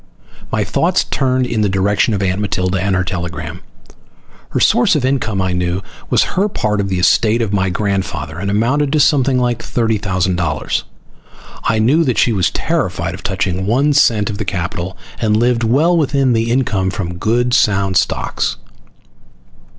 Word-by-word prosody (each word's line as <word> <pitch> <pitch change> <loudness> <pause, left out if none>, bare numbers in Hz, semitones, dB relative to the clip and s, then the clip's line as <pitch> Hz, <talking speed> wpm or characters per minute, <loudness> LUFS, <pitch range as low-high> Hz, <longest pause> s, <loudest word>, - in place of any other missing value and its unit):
My - - +1
thoughts - - +1
turned 130 -1 0
in 115 -3 -1
the 105 - +2
direction 100 +3 +1
of 100 - -2
Aunt 95 +1 0
Matilda 95 -2 -1
and 95 0 0
her 95 - +1
telegram. 85 -2 -5 0.9
Her - - -1
source 125 - +3
of 140 -4 0
income, 110 -8 0
I 95 -1 -1
knew, 90 +1 -2 0.3
was - - +3
her 200 +3 +1
part 105 - -1
of 100 - -3
the 95 - -1
estate 110 +5 +3
of 110 -3 -1
my 95 -2 +1
grandfather, 95 -4 -3
and 100 +1 -3
amounted 130 +8 +1
to 155 - +3
something 135 -3 +3
like 120 -2 0
thirty 115 -3 -1
thousand 95 -3 -1
dollars. 75 -8 -2 0.8
I 110 - +2
knew 130 +10 +3
that 130 -6 0
she 120 - +3
was 95 -1 +1
terrified 90 - -2
of 90 - -9
touching 95 -1 -2
one 140 +7 +2
cent 110 -7 +3
of 100 - -7
the - - -1
capital, 90 -1 -4 0.2
and 105 -2 +2
lived 120 +1 +1
well 145 +10 +3
within 140 -5 +2
the 115 0 0
income 110 -7 0
from 90 -2 -5
good 120 +4 +1
sound 100 -5 +2
stocks. - - 0
105 Hz, 175 wpm, -16 LUFS, 95-125 Hz, 0.9 s, source